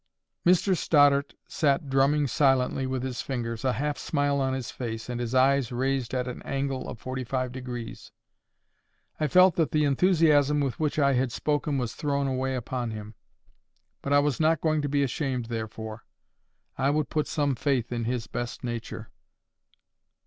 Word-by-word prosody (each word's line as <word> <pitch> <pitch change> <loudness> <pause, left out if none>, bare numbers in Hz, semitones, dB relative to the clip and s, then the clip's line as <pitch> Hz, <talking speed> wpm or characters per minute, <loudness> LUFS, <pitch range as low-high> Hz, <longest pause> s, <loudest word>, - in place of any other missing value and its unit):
Mr 185 +2 +4
Stoddart 145 -3 +3
sat 145 -4 +1
drumming 135 +2 +3
silently 135 0 +2
with 130 -1 -2
his 130 -2 -3
fingers, 115 -4 -4
a 130 -1 +2
half 145 +2 -2
smile 145 -2 0
on 130 0 0
his 130 -3 -5
face, 115 -3 -5
and 120 -1 -3
his 120 +1 -3
eyes 135 -1 +3
raised 130 0 -1
at 125 0 -1
an 125 - -6
angle 135 -1 -3
of 110 - -8
forty 130 +1 -4
five 130 0 -2
degrees. 125 -2 -7 1.1
I 155 - +1
felt 185 +1 +5
that 165 -3 +2
the 150 -1 +1
enthusiasm 150 -1 +3
with 135 -3 -2
which 155 -2 -1
I 140 -2 +3
had 125 -1 +1
spoken 145 +2 -1
was 120 -3 -2
thrown 140 -1 -1
away 130 0 -1
upon 125 0 -3
him. 110 0 -7 0.9
But 140 - -4
I 145 - +6
was 145 -3 +1
not 160 0 +3
going 155 -1 +1
to 145 - -2
be 140 0 +2
ashamed 130 -2 -2
therefore. 110 -1 -5 0.8
I 135 - +2
would 150 0 0
put 155 -1 0
some 145 -3 0
faith 130 -3 -1
in 120 -1 -2
his 120 -1 -2
best 120 -1 -5
nature. 120 -2 -5
135 Hz, 170 wpm, -27 LUFS, 125-145 Hz, 1.1 s, I